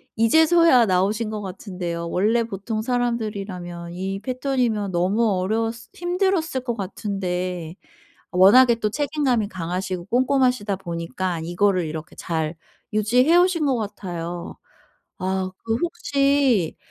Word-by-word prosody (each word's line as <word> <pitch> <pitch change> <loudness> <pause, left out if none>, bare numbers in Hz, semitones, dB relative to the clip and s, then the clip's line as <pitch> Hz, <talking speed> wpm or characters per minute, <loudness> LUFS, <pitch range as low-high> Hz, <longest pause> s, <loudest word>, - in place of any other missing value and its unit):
이제서야 320 +2 +5
나오신 205 +4 +1
것 215 -1 -4
같은데요. 180 -3 -5
원래 220 +7 +2
보통 215 0 -4
사람들이라면 205 -8 -3
이 190 +2 -3
패턴이면 250 -4 -1
너무 190 +6 +1
어려웠을 225 +4 -2
힘들었을 350 -5 0
것 240 -2 -1
같은데 180 -4 -4 0.6
워낙에 235 +7 +6
또 215 -2 -1
책임감이 275 -4 0
강하시고 180 0 -4
꼼꼼하시다 250 -4 +1
보니까 170 0 -3
이거를 180 +1 +1
이렇게 155 0 -7
잘 160 -1 -3 0.4
유지해 245 +9 +3
오신 355 -3 +3
것 265 -3 +2
같아요. 175 -5 -5 0.6
아 185 0 -1
그 225 - 0
혹시 275 - +1
210 Hz, 290 characters per minute, -23 LUFS, 180-250 Hz, 0.6 s, 워낙에